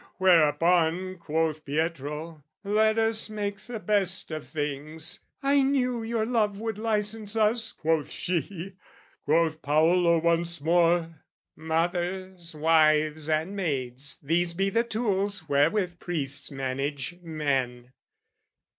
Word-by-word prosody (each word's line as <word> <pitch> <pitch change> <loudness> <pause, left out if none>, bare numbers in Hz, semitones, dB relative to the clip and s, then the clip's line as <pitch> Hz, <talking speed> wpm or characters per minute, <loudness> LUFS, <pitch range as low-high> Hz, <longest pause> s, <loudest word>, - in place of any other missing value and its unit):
Whereupon 175 +1 +3
Quoth 160 -1 -1
Pietro 155 +1 -3 0.2
"Let 215 +2 +2
us 225 0 +2
make 205 -2 -4
the 220 +3 -7
best 200 -4 +1
of 155 0 -5
things!" 155 +2 -4 0.2
"I 280 0 +4
knew 255 -3 +1
your 225 -1 -1
love 215 -4 0
would 220 -1 -4
licence 215 -1 -1
us," 220 0 +2
quoth 160 -2 0
she: 180 +1 -3 0.5
Quoth 160 +1 +2
Paolo 170 +3 +3
once 170 0 +1
more, 165 0 +2 0.3
"Mothers, 175 +2 -2
wives, 155 -1 +3
and 160 +6 0
maids, 140 -7 -2
"These 170 +3 +1
be 195 +2 0
the 230 +3 +2
tools 205 -6 -2
wherewith 175 +5 +1
priests 145 -5 0
manage 140 +4 -3
men." 135 -7 -2
170 Hz, 110 wpm, -27 LUFS, 155-205 Hz, 0.5 s, I